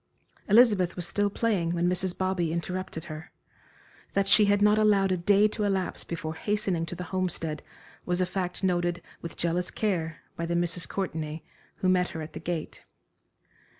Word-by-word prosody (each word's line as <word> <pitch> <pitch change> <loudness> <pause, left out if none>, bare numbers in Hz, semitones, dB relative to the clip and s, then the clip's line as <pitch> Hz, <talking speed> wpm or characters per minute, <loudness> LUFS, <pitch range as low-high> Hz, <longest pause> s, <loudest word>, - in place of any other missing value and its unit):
Elizabeth 205 -5 +5
was 180 - -2
still 205 +3 +1
playing 195 -6 0
when 175 +1 +1
Mrs. 180 0 -1
Bobby 185 -3 0
interrupted 170 -1 -4
her. 155 +1 -8 0.8
That 200 0 +1
she 210 +1 +7
had 205 0 +3
not 210 +1 +5
allowed 200 -3 +4
a - - +3
day 200 +4 +4
to 210 - -3
elapse 195 -2 0
before 160 -2 -4
hastening 190 -2 -1
to 175 - -5
the 180 - -5
Homestead 165 -4 -1 0.4
was 180 0 0
a 185 - +3
fact 180 0 -3
noted 175 -2 0 0.2
with 170 - -7
jealous 175 +1 0
care 165 -7 -2
by 170 - -3
the 170 - -1
Misses 175 0 0
Courtenay, 160 -5 -4 0.3
who 185 - -1
met 180 -1 +3
her 160 - -4
at 155 - -9
the - - -6
gate. 165 -1 -4
180 Hz, 175 wpm, -28 LUFS, 170-195 Hz, 0.8 s, she